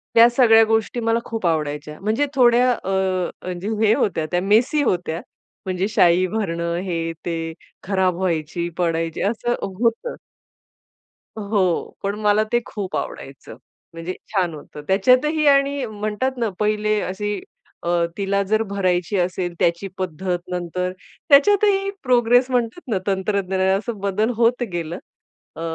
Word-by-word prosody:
त्या 230 +1 +8
सगळ्या 235 -2 +6
गोष्टी 225 +2 0
मला 230 0 +1
खूप 225 -5 -4
आवडायच्या. 150 -1 -2
म्हणजे 220 +8 +1
थोड्या 250 -1 +5
अ, 230 - -4 0.6
म्हणजे 180 +2 -5 0.2
हे 215 - +5
होत्या, 175 -8 0
त्या 175 - +1
मेसी 225 +10 +3
होत्या. 175 -6 -1 0.4
म्हणजे 185 +1 -1
शाई 180 -3 +4
भरणं, 170 -5 -2
हे-ते, 165 -1 -3 0.3
खराब 190 -2 +1
व्हायची, 170 -2 -2
पडायची, 165 -2 -1
असं 235 +3 0
होतं. 230 - -1 1.2
हो. 200 -4 -1
पण 200 +1 -1
मला 210 +1 +3
ते 240 - +3
खूप 200 -3 -5
आवडायचं. 135 0 -7 0.4
म्हणजे 165 +2 -5 0.2
छान 180 -4 +1
होतं. 150 0 -10
त्याच्यातही 255 +10 +3
आणि 280 -1 +3
म्हणतात 215 +4 -3
ना, 230 -3 0
पहिले 215 0 +1
अशी 205 +1 -3 0.5
अ, 170 - -1 0.3
तिला 200 0 0
जर 215 0 +3
भरायची 190 -2 0
असेल. 180 0 -1
त्याची 170 +3 +1
पद्धत 180 0 -2
नंतर 180 +1 -2 0.4
त्याच्यातही 395 +6 +5
प्रोग्रेस 245 -1 +4
म्हणतात 245 +6 -1
ना, 205 - +2
तंत्रज्ञान 190 -1 0 0.2
असं 220 +2 -5
बदल 200 +3 0
होत 240 +2 +2
गेलं. 170 0 -3 0.6
अ, - - -8
200 Hz, 135 wpm, -21 LUFS, 175-230 Hz, 1.2 s, त्या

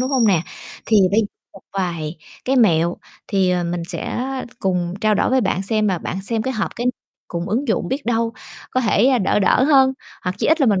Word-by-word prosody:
đúng 255 +1 -1
hông 255 -5 +3
nè? 180 -5 +3 0.4
Thì 220 - +4
bây 215 +3 +3 0.3
một 195 - -13
vài 170 -4 -3 0.3
cái 265 +1 +1
mẹo, 170 -7 +3 0.3
thì, 190 -3 +2
ờ, 180 -1 0
mình 170 0 -2
sẽ - - -4 0.4
cùng 180 -2 -1
trao 215 -1 +3
đổi - - +1
với 260 0 +3
bạn 190 -2 0
xem, 215 +1 0
mà 185 -4 +1
bạn 190 +3 -5
xem 220 +2 -1
cái 260 - -2
hợp 210 -3 -1
cái 240 - -2 0.4
cùng 170 +2 -4
ứng 245 +7 -1
dụng 185 -5 0
biết 275 +2 -3
đâu 230 -1 +1 0.4
có 255 - +1
thể, 230 0 +3
ờ, 260 -2 +3
đỡ 195 - +2
đỡ 205 +6 +3
hơn. 265 -2 +5 0.3
Hoặc 180 +1 -1
chí - - 0
ít 320 +2 +3
là 275 - +4
mình 205 -4 +3
210 Hz, 230 wpm, -20 LUFS, 180-245 Hz, 0.4 s, hơn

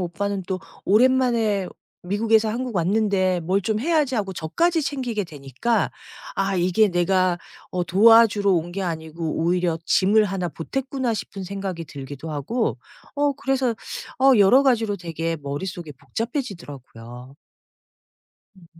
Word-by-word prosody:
오빠는 195 +2 -3
또 185 -1 -3 0.2
'오랜만에 230 -3 +3 0.4
미국에서 215 +4 +2
한국 240 -1 -3
왔는데 185 0 +1
뭘 185 +4 0
좀 215 +1 -1
해야지.' 300 -2 +1
하고 195 -4 -1
저까지 325 - 0
챙기게 255 -8 -2
되니까 150 - -2 0.5
'아 195 0 0
이게 185 +4 +3
내가 180 0 +2 0.4
어 180 -1 0
도와주러 205 +2 +5
온 175 0 0
게 195 - -5
아니고 160 -1 -4
오히려 175 -1 +1
짐을 210 +3 +4
1 190 -2 -2
보탰구나.' 260 - -3
싶은 200 -2 -6
생각이 190 -3 -5
들기도 145 +2 -8
하고 185 - -2 0.4
어 290 0 +2
그래서 270 -2 0 0.5
어 270 0 +6
여러 220 +8 +6
가지로 225 -6 +2
되게 165 -1 -3
머릿속에 160 +3 -5
복잡해지더라고요. 140 - -7 1.2
음. 175 - -18
195 Hz, 295 characters per minute, -23 LUFS, 170-230 Hz, 1.2 s, 어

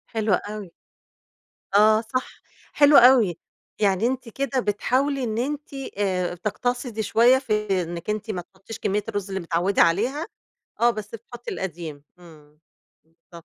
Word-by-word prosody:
حلو 215 -3 +1
أوي. 205 -2 -3 1.0
آه 215 +1 +6
صح، 255 +3 -5 0.3
حلو 290 -1 +6
أوي 235 -9 +6 0.4
يعني 200 +3 +2
أنتِ 255 -2 -3
كده 270 +2 -2
بتحاولي 260 +6 0
إن 220 -2 -2
أنتِ 290 +4 -3 0.3
آآ، 185 -3 -1
تقتصدي 230 +4 -3
شوية 235 +5 +5
في 210 -6 0
إنِّك 170 +3 -7
أنتِ 215 +1 -2
ما 180 -3 -4
تحطّيش 195 +5 -12
كمية 205 +1 -1
الرز 205 -2 -3
اللي 190 0 -3
متعوّدة 175 +3 +1
عليها، 240 - +1 0.5
آه، 240 +1 +5
بس 215 0 -7
بتحطّي 240 +2 -9
القديم، 165 -6 -6 0.2
امم، 150 -3 -17 0.5
بالضبط. 165 0 -16
210 Hz, 135 wpm, -24 LUFS, 180-245 Hz, 1.0 s, آه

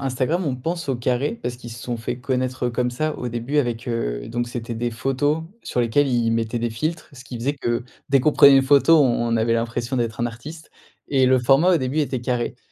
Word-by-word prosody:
Instagram, 135 +7 -1
on 135 -4 -1
pense 170 +5 -4
au 135 - 0
carré. 125 - -1
Parce 125 0 -4
qu'ils 120 -1 -10
se 115 0 -9
sont 120 -1 -4
fait 115 +1 -4
connaître, 130 -1 -2
heu, - - -1
comme 125 +1 -1
ça. 155 +5 -2
Au 125 - -4
début 120 +5 -2
avec, 120 -4 -1
heu 110 - -3
donc 120 +1 -2
c'étaient 120 -1 -5
des 120 +1 -2
photos 135 +7 -1 0.2
sur 125 - -2
lesquelles 120 +5 +2
ils 120 -3 +1
mettaient 115 +1 -1
des 120 0 -2
filtres. 155 +9 -3
Ce 130 -3 -12
qui 125 -1 -7
faisait 135 +5 -1
que 120 -4 -2 0.2
dès 140 - +4
qu'on 150 +4 +2
prenait 140 -1 +8
une 135 - +5
photo, 145 +4 +5
on 120 -3 +2
on - - +2
avait 115 +1 +1
l'impression 115 +2 -2
d'être 115 -2 -2
un 120 - +1
artiste 145 +8 -9 0.4
et 135 -2 +3
le 130 0 +4
format 135 +8 +4
au - - +4
début 130 +3 -2
était 135 -4 -2
carré. 120 -1 -2
125 Hz, 240 wpm, -22 LUFS, 120-140 Hz, 0.4 s, prenait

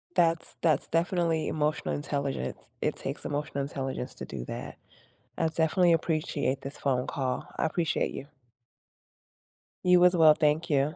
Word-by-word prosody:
That's 165 -2 +2
that's 155 -5 +2
definitely 165 -1 +1
emotional 150 0 -1
intelligence. 140 -2 -2 0.2
It - - 0
takes - - -5
emotional 145 -1 -2
intelligence 135 -2 -4
to - - -7
do - - -6
that. - - -7 0.6
I 165 - +2
definitely 165 +2 +3
appreciate 150 -4 0
this 135 +2 -7
phone 130 -3 0
call, 130 -2 -2
I - - +1
appreciate 165 0 0
you. 140 - -7 1.6
You 180 -1 +6
as 180 0 +6
well, 160 -2 +7
thank 155 +2 +1
you. 145 +3 +2
155 Hz, 140 wpm, -28 LUFS, 140-165 Hz, 1.6 s, well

